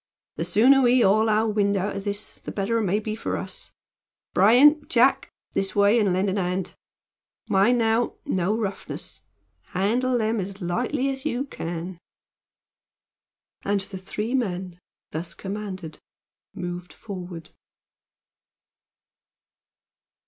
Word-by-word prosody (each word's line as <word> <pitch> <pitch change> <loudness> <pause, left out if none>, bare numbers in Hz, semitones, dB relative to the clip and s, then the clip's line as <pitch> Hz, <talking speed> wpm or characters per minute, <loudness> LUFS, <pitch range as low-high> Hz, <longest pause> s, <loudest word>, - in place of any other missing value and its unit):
"The 165 - -1
sooner 230 +10 +5
we 250 0 +5
haul 215 +2 +4
our 215 +1 +3
wind 205 -2 +1
out 195 +2 -2
o' - - -2
this 205 +1 -5
the - - -7
better 210 +3 0
it - - 0
may 195 +2 +2
be 215 0 -4
for - - -3
us. - - -7 0.6
Bryan! 275 +10 +6
Jack! 250 +1 +3 0.2
This 195 0 -1
way, 205 +3 +5
and 205 -4 +2
lend 185 +3 +1
a 195 +1 0
hand. 180 +1 -2 0.7
Mind 205 +6 +4
now, 225 +1 +1
no 190 +4 0
roughness! 200 -4 -5 0.5
Handle 245 +7 +1
them 220 0 0
as 195 +1 -5
lightly 245 - -1
as 265 -1 -4
you 250 +3 -1
can." 170 - -6 1.6
And 200 0 +1
the 190 0 -6
three 210 +5 -4
men, 185 -8 -2 0.3
thus 165 +1 -4
commanded, 190 -4 -6 0.6
moved 175 -1 -6
forward. 180 -5 -8
200 Hz, 125 wpm, -25 LUFS, 185-230 Hz, 1.6 s, Bryan